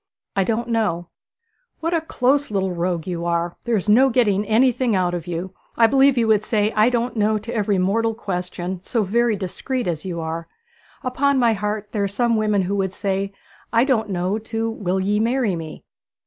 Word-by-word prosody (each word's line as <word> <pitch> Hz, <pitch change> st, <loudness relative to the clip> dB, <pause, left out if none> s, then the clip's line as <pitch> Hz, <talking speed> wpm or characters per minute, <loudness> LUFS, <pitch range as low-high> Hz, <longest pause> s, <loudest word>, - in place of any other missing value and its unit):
'I 195 Hz, -, +3 dB
don't 235 Hz, +2 st, -1 dB
know.' 190 Hz, -7 st, 0 dB, 0.7 s
'What 330 Hz, +2 st, -1 dB
a 330 Hz, -, +2 dB
close 285 Hz, -2 st, +1 dB
little 190 Hz, -2 st, 0 dB
rogue 175 Hz, -1 st, -2 dB
you 175 Hz, -2 st, -3 dB
are! 170 Hz, 0 st, -1 dB
There 235 Hz, -1 st, +1 dB
is 195 Hz, -, -4 dB
no 250 Hz, +6 st, +6 dB
getting 210 Hz, -5 st, +2 dB
anything 245 Hz, 0 st, +3 dB
out 180 Hz, -1 st, +1 dB
of 175 Hz, -1 st, -4 dB
you. 175 Hz, +2 st, -4 dB, 0.2 s
I 230 Hz, -, +6 dB
believe 270 Hz, +3 st, +4 dB
you 230 Hz, -2 st, +2 dB
would 215 Hz, -1 st, +3 dB
say 215 Hz, -1 st, +1 dB
"I 215 Hz, +2 st, +4 dB
don't 245 Hz, 0 st, -1 dB
know," 215 Hz, 0 st, +2 dB
to 220 Hz, +3 st, -6 dB
every 205 Hz, -3 st, +1 dB
mortal 220 Hz, +5 st, +1 dB
question, 180 Hz, -3 st, -4 dB
so 230 Hz, +1 st, 0 dB
very 230 Hz, +3 st, +2 dB
discreet 235 Hz, +7 st, -3 dB
as 165 Hz, -3 st, -2 dB
you 180 Hz, -3 st, -4 dB
are. 165 Hz, +1 st, -4 dB, 0.6 s
Upon 275 Hz, +2 st, +1 dB
my 235 Hz, -3 st, +4 dB
heart, 210 Hz, 0 st, -3 dB
there 205 Hz, -2 st, -1 dB
are -, -, +1 dB
some 230 Hz, +4 st, +1 dB
women 210 Hz, -2 st, +1 dB
who 195 Hz, +3 st, -1 dB
would 190 Hz, -1 st, -1 dB
say 195 Hz, 0 st, -1 dB, 0.4 s
"I 230 Hz, +1 st, +4 dB
don't 235 Hz, -6 st, +1 dB
know," 185 Hz, +3 st, -1 dB
to 225 Hz, +1 st, -3 dB
"Will 190 Hz, -4 st, -2 dB
ye 205 Hz, +2 st, +1 dB
marry 230 Hz, -3 st, +1 dB
me?"' 160 Hz, -2 st, -8 dB
210 Hz, 200 wpm, -22 LUFS, 185-235 Hz, 0.7 s, no